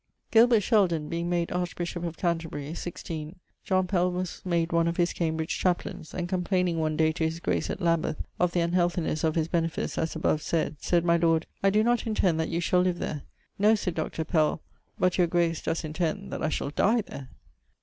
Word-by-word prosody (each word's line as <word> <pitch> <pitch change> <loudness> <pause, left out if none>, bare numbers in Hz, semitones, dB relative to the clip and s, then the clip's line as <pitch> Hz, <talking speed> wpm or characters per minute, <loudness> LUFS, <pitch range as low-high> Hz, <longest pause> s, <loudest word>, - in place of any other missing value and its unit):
Gilbert 230 -1 +6
Sheldon 180 -9 +2
being 170 +1 -2
made 170 -1 0
archbishop 175 -1 -3
of 170 -1 -4
Canterbury, 165 -4 -2
16, 165 -2 -6 0.3
John 185 -1 +1
Pell[XLVI.] 180 -1 +1
was 180 -1 -4
made 170 -2 0
one 170 0 +3
of 170 - -1
his 175 0 +2
Cambridge[XLVII.] 160 -1 -1
chapleines; 175 -3 -1
and 175 -1 -2
complaining 180 -1 0
one 155 -1 0
day 160 0 +3
to 160 - -3
his 160 +1 -1
Grace - - -1
at - - -3
Lambith 170 -3 +1 0.2
of 180 -1 +2
the 175 - +1
unhealthinesse 175 -2 0
of 160 -1 +1
his 160 -1 +1
benefice 165 -1 -1
as 160 - -1
abovesayd, 155 -1 0
sayd 175 -1 +1
my 170 0 +4
Lord, 165 -1 +2 0.2
'I 195 - +4
doe 210 +2 +3
not 240 0 +1
intend 185 -7 +1
that 160 - -1
you 170 - -1
shall 180 +1 +2
live 180 -1 +1
there.' 150 -3 -4 0.4
'No,' 210 +2 +5
sayd 185 -4 -2
[Doctor] 160 0 -3
Pell, 155 -1 +1 0.3
('but 180 0 +1
your 175 - +5
grace 170 -1 +1
does 165 - -2
intend 170 +5 -3
that) - - -4
I 155 - +1
shall 140 -2 -2
die 225 +9 +3
there.' 140 -9 -9
170 Hz, 200 wpm, -27 LUFS, 160-180 Hz, 0.4 s, Gilbert